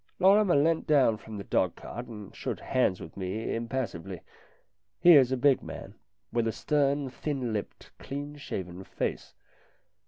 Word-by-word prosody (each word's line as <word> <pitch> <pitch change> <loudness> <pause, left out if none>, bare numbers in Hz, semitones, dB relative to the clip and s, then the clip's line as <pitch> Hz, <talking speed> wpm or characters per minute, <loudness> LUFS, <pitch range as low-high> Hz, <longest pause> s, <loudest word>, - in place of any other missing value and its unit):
Lorrimer 195 0 +5
leant 160 +3 +2
down 135 -7 +4
from 110 0 -9
the 100 - -5
dog - - +1
cart 120 +2 -8
and 105 -4 -10
shook - - -4
hands 115 -8 +1
with 80 - -10
me 100 +3 -3
impassively. 115 -7 -4 0.8
He 175 +6 +8
is 130 -4 +6
a 130 - +1
big 135 +1 +4
man, - - -8 0.4
with 115 -1 +1
a - - +1
stern, 140 +1 +1
thin 130 -5 -3
lipped, 105 -2 -5
clean 145 +2 -6
shaven 95 -9 -6
face. 95 - -4
125 Hz, 155 wpm, -29 LUFS, 105-145 Hz, 0.8 s, He